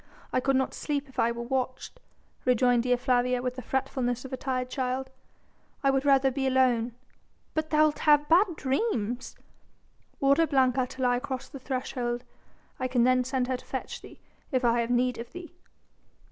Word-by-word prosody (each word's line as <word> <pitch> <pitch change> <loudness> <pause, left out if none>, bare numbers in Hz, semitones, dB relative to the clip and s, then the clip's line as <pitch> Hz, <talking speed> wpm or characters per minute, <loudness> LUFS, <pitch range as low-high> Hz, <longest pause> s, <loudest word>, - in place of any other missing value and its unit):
I - - +3
could 270 +1 +1
not 265 0 +1
sleep 290 -1 -3
if 265 - -9
I 230 - +3
were 235 0 -5
watched," 255 +1 -3 0.4
rejoined 245 -1 +3
Dea 250 +1 +2
Flavia 250 0 +1
with 250 0 -3
the 255 - -6
fretfulness 255 -1 -2
of 265 - -8
a - - +1
tired 255 -1 -2
child. 260 0 -3 0.7
"I 275 - +4
would 270 +1 0
rather 270 -1 +4
be 265 +1 -1
alone." 250 -3 +2 0.6
"But 315 0 -1
thou'lt 305 -1 +3
have 295 -1 +4
bad 345 +2 +4
dreams." 260 - -1 0.8
"Order 280 +4 +4
Blanca 260 -3 +2
to 260 +1 -6
lie 245 -1 +3
across 260 0 -5
the 275 - -9
threshold. 250 -2 -3 0.6
I 255 - 0
can 250 -2 +2
then 255 0 +4
send 260 0 -1
her 255 -1 -1
to - - -15
fetch - - -5
thee, - - -13 0.3
if 255 -2 +1
I 235 0 +3
have 230 - -3
need 245 0 +1
of 235 +1 -8
thee." 355 -1 -9
255 Hz, 180 wpm, -28 LUFS, 245-270 Hz, 0.8 s, I